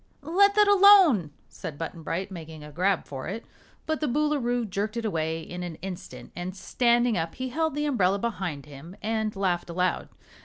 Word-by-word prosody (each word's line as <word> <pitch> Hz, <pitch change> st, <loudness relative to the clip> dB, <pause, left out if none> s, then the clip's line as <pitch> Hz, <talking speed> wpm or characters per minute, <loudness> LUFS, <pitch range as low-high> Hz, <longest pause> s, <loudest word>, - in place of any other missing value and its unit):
"Let 400 Hz, +6 st, +4 dB
that 420 Hz, -1 st, +5 dB
alone!" 385 Hz, -, +7 dB, 0.2 s
said 150 Hz, -, -8 dB
Button 165 Hz, +1 st, -6 dB
Bright, 185 Hz, +5 st, -3 dB
making 160 Hz, -3 st, -9 dB
a 150 Hz, -, -10 dB
grab 185 Hz, +4 st, +1 dB
for 135 Hz, -2 st, -7 dB
it. 215 Hz, +6 st, -5 dB, 0.4 s
But 315 Hz, -1 st, -1 dB
the 305 Hz, -, +1 dB
Boolooroo 250 Hz, -4 st, 0 dB
jerked 205 Hz, +4 st, -3 dB
it 230 Hz, -, -2 dB
away 160 Hz, -4 st, -1 dB
in 180 Hz, +2 st, -7 dB
an 175 Hz, -2 st, -5 dB
instant 185 Hz, +1 st, -8 dB
and 180 Hz, +2 st, -5 dB
standing 240 Hz, 0 st, +2 dB
up 165 Hz, 0 st, -4 dB
he 260 Hz, 0 st, -4 dB
held 320 Hz, +2 st, -1 dB
the 295 Hz, 0 st, -1 dB
umbrella 200 Hz, -9 st, +2 dB
behind 190 Hz, -, -3 dB
him 150 Hz, +5 st, -11 dB
and 220 Hz, -1 st, -1 dB
laughed 180 Hz, -3 st, -1 dB
aloud. 180 Hz, +2 st, -1 dB
195 Hz, 185 wpm, -26 LUFS, 170-255 Hz, 0.4 s, alone